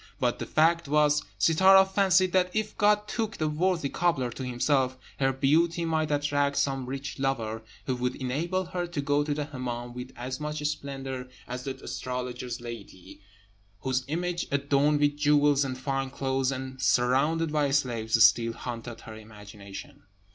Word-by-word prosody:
But -, -, 0 dB
the -, -, -4 dB
fact 165 Hz, +1 st, +3 dB
was, 150 Hz, 0 st, +3 dB, 0.2 s
Sittâra 190 Hz, +4 st, +6 dB
fancied 190 Hz, -1 st, +3 dB
that 180 Hz, -1 st, +3 dB
if 215 Hz, 0 st, -1 dB
God 210 Hz, 0 st, +3 dB
took 220 Hz, 0 st, -3 dB
the 155 Hz, -, 0 dB
worthy 165 Hz, 0 st, 0 dB
cobbler 140 Hz, -6 st, 0 dB
to 130 Hz, -, -6 dB
himself, 130 Hz, +1 st, +1 dB, 0.2 s
her 135 Hz, -1 st, +3 dB
beauty 165 Hz, +6 st, +2 dB
might 160 Hz, -2 st, 0 dB
attract 145 Hz, -1 st, +1 dB
some 135 Hz, -2 st, 0 dB
rich 135 Hz, +1 st, -5 dB
lover, 115 Hz, -5 st, -1 dB, 0.2 s
who 130 Hz, -, -1 dB
would 125 Hz, 0 st, -1 dB
enable 165 Hz, +9 st, -2 dB
her 175 Hz, 0 st, -3 dB
to 170 Hz, -3 st, -5 dB
go 145 Hz, +1 st, +1 dB
to 150 Hz, -, -3 dB
the 150 Hz, 0 st, -2 dB
Hemmâm 120 Hz, -4 st, -5 dB
with 125 Hz, +1 st, -7 dB
as 130 Hz, +2 st, -5 dB
much 150 Hz, 0 st, -4 dB
splendour 135 Hz, -3 st, -5 dB, 0.2 s
as 125 Hz, 0 st, -6 dB
the 135 Hz, -1 st, -3 dB
astrologer's 125 Hz, -1 st, -4 dB
lady, 115 Hz, -6 st, -10 dB, 0.6 s
whose 130 Hz, 0 st, 0 dB
image, 175 Hz, +3 st, -2 dB
adorned 140 Hz, +1 st, +2 dB
with 145 Hz, 0 st, +2 dB
jewels 145 Hz, -1 st, +4 dB
and 130 Hz, -2 st, -3 dB
fine 135 Hz, 0 st, -2 dB
clothes, 135 Hz, 0 st, -1 dB
and 130 Hz, 0 st, -6 dB
surrounded 140 Hz, +7 st, +2 dB
by 150 Hz, -2 st, +1 dB
slaves, 115 Hz, -5 st, +2 dB
still 115 Hz, +3 st, +5 dB
haunted 120 Hz, 0 st, -7 dB
her 110 Hz, -, -10 dB
imagination. 105 Hz, -2 st, -11 dB
140 Hz, 160 wpm, -28 LUFS, 125-155 Hz, 0.6 s, Sittâra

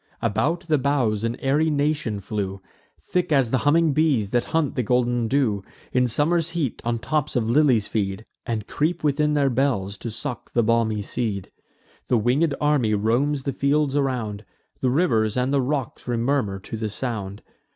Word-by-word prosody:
About 160 Hz, +11 st, 0 dB
the 155 Hz, -5 st, +1 dB
boughs 125 Hz, -6 st, +1 dB
an 115 Hz, +1 st, -1 dB
airy 145 Hz, +4 st, +2 dB
nation 145 Hz, -8 st, 0 dB
flew, 100 Hz, -1 st, -3 dB, 0.4 s
Thick 175 Hz, -, -2 dB
as 135 Hz, -6 st, +3 dB
the 130 Hz, -, +2 dB
humming 155 Hz, +1 st, +3 dB
bees, 135 Hz, -10 st, +2 dB
that 120 Hz, -1 st, +1 dB
hunt 160 Hz, -4 st, 0 dB
the 125 Hz, -, 0 dB
golden 120 Hz, 0 st, +1 dB
dew; 110 Hz, -6 st, +1 dB, 0.3 s
In 125 Hz, 0 st, +3 dB
summer's 160 Hz, +7 st, +1 dB
heat 165 Hz, -8 st, -2 dB
on 120 Hz, 0 st, 0 dB
tops 150 Hz, +5 st, -1 dB
of 115 Hz, -3 st, +1 dB
lilies 130 Hz, -6 st, +3 dB
feed, 100 Hz, 0 st, -2 dB, 0.2 s
And 110 Hz, -3 st, -3 dB
creep 155 Hz, +9 st, -1 dB
within 150 Hz, 0 st, +2 dB
their 140 Hz, -2 st, +2 dB
bells, 120 Hz, -7 st, 0 dB
to 115 Hz, -, -5 dB
suck 115 Hz, +2 st, -6 dB
the 120 Hz, -, +3 dB
balmy 110 Hz, -2 st, +1 dB
seed: 100 Hz, -3 st, -3 dB, 0.6 s
The 125 Hz, -, +3 dB
winged 135 Hz, +7 st, +2 dB
army 140 Hz, -8 st, +2 dB
roams 130 Hz, +7 st, +1 dB
the 140 Hz, -, -2 dB
fields 140 Hz, +1 st, +1 dB
around; 120 Hz, -7 st, -1 dB, 0.4 s
The 130 Hz, -, +1 dB
rivers 120 Hz, -, +2 dB
and 125 Hz, +2 st, +1 dB
the 140 Hz, -, +3 dB
rocks 135 Hz, 0 st, -3 dB
remurmur 120 Hz, -4 st, 0 dB
to 110 Hz, -, -6 dB
the 110 Hz, -1 st, -2 dB
sound. 105 Hz, -3 st, -5 dB
125 Hz, 170 wpm, -23 LUFS, 110-145 Hz, 0.6 s, as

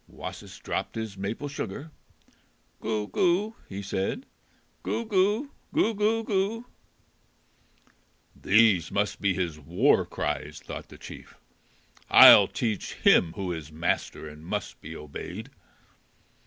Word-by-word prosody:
Wasis -, -, -9 dB
dropped -, -, -4 dB
his 110 Hz, -3 st, -5 dB
maple 100 Hz, +9 st, -4 dB
sugar. 140 Hz, +2 st, -6 dB, 0.9 s
"Goo, 110 Hz, -2 st, -2 dB
goo!" 190 Hz, -, +1 dB
he 100 Hz, +1 st, -6 dB
said; 100 Hz, -, -3 dB, 0.6 s
"Goo, 230 Hz, -, -2 dB
goo! 210 Hz, +6 st, +1 dB, 0.2 s
Goo, 285 Hz, -7 st, +2 dB
goo, 220 Hz, +2 st, +1 dB
goo!" 215 Hz, +3 st, -1 dB, 1.7 s
"These 100 Hz, -5 st, +3 dB
must 100 Hz, 0 st, -1 dB
be 100 Hz, -2 st, +1 dB
his 85 Hz, -5 st, -3 dB
war 70 Hz, -, +2 dB
cries!" 75 Hz, -2 st, -4 dB
thought -, -, -8 dB
the -, -, -13 dB
chief. -, -, -12 dB, 0.7 s
"I'll -, -, +10 dB
teach 110 Hz, -4 st, -3 dB
him 80 Hz, -2 st, +4 dB
who 95 Hz, -3 st, -4 dB
is 80 Hz, -2 st, -8 dB
master 80 Hz, -1 st, -2 dB
and 75 Hz, +1 st, -12 dB
must 105 Hz, +5 st, -5 dB
be 80 Hz, +1 st, -8 dB
obeyed." 75 Hz, -2 st, -8 dB
105 Hz, 120 wpm, -27 LUFS, -, 1.7 s, I'll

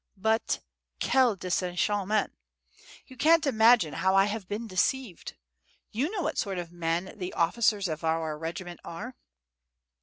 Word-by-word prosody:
But, 220 Hz, +3 st, 0 dB, 0.4 s
quel 255 Hz, -5 st, +3 dB
desenchantement! 190 Hz, +3 st, 0 dB, 0.7 s
You 260 Hz, -, -14 dB
can't 320 Hz, +5 st, +4 dB
imagine 225 Hz, -, +4 dB
how 190 Hz, 0 st, +1 dB
I 195 Hz, 0 st, +6 dB
have 205 Hz, -2 st, -4 dB
been 210 Hz, +4 st, -4 dB
deceived! 215 Hz, +1 st, -1 dB, 0.6 s
You 260 Hz, +9 st, -1 dB
know 390 Hz, -3 st, -3 dB
what 310 Hz, -, -2 dB
sort 195 Hz, -3 st, -2 dB
of 175 Hz, -1 st, -5 dB
men 175 Hz, +1 st, -2 dB
the 180 Hz, -1 st, -4 dB
officers 205 Hz, +3 st, +2 dB
of 160 Hz, 0 st, -5 dB
our 160 Hz, -1 st, 0 dB
regiment 170 Hz, +3 st, -6 dB
are." 235 Hz, +10 st, -7 dB
195 Hz, 140 wpm, -28 LUFS, 175-235 Hz, 0.7 s, I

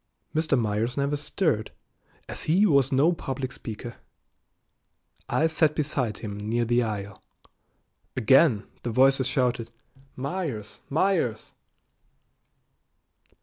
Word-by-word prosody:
Mr. 155 Hz, -3 st, +2 dB
Myers 110 Hz, +3 st, -1 dB
never 140 Hz, +1 st, +1 dB
stirred, 145 Hz, -, -1 dB, 0.6 s
as -, -, -5 dB
he 180 Hz, +7 st, +4 dB
was 140 Hz, -, +3 dB
no 145 Hz, +6 st, +4 dB
public 135 Hz, -4 st, -4 dB
speaker. 115 Hz, +1 st, -7 dB, 1.3 s
I 160 Hz, -, +2 dB
sat 155 Hz, -1 st, +2 dB
beside 140 Hz, -7 st, -1 dB
him 105 Hz, -2 st, -6 dB
near 115 Hz, +3 st, 0 dB
the 120 Hz, +1 st, +2 dB
aisle. 105 Hz, -3 st, -4 dB, 1.0 s
Again 130 Hz, -1 st, +4 dB, 0.2 s
the 120 Hz, -, -3 dB
voices 130 Hz, +2 st, +4 dB
shouted 125 Hz, -3 st, 0 dB, 0.5 s
"Myers! 135 Hz, -, -4 dB
Myers!" 155 Hz, -, 0 dB
130 Hz, 105 wpm, -26 LUFS, 115-150 Hz, 1.3 s, he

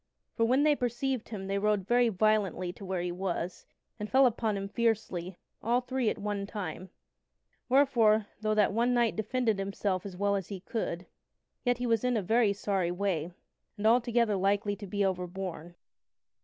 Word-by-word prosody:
For, 230 Hz, -, +2 dB
when 260 Hz, +5 st, +3 dB
they 300 Hz, -1 st, +4 dB
perceived 250 Hz, 0 st, -2 dB
him, 205 Hz, -4 st, -5 dB
they 195 Hz, +1 st, -1 dB
rode 210 Hz, -2 st, +1 dB
very 240 Hz, 0 st, +4 dB
violently 200 Hz, -3 st, +1 dB
to 200 Hz, -, -12 dB
where 185 Hz, -2 st, -2 dB
he 175 Hz, -, -2 dB
was, 180 Hz, -1 st, -4 dB, 0.3 s
and 210 Hz, 0 st, -4 dB
fell 265 Hz, +1 st, +5 dB
upon 225 Hz, -3 st, +1 dB
him 195 Hz, 0 st, -4 dB
fiercely, 200 Hz, -5 st, -1 dB, 0.2 s
all 240 Hz, +3 st, +2 dB
three 255 Hz, -2 st, 0 dB
at -, -, -3 dB
one 205 Hz, -1 st, -3 dB
time; 185 Hz, -3 st, -6 dB, 0.8 s
wherefore, 240 Hz, -6 st, +4 dB
though 215 Hz, 0 st, 0 dB
that 210 Hz, -1 st, +3 dB
one 240 Hz, +3 st, +2 dB
knight 235 Hz, -2 st, +2 dB
defended 220 Hz, -1 st, 0 dB
himself 195 Hz, -1 st, -2 dB
as 190 Hz, -3 st, -8 dB
well 200 Hz, +1 st, +1 dB
as 195 Hz, -3 st, -3 dB
he 195 Hz, -3 st, -7 dB
could, 185 Hz, -4 st, -3 dB, 0.6 s
yet 245 Hz, -1 st, +1 dB
was 230 Hz, -3 st, +2 dB
he 250 Hz, -, 0 dB
in 245 Hz, -2 st, +1 dB
a 210 Hz, -, -1 dB
very 220 Hz, +2 st, +3 dB
sorry 195 Hz, -3 st, -1 dB
way, 175 Hz, -3 st, -1 dB, 0.5 s
and 205 Hz, -, -4 dB
altogether 235 Hz, -1 st, +3 dB
likely 200 Hz, +2 st, +1 dB
to 205 Hz, -1 st, -8 dB
be 200 Hz, +1 st, 0 dB
overborne. 180 Hz, -2 st, -4 dB
205 Hz, 180 wpm, -30 LUFS, 190-235 Hz, 0.8 s, fell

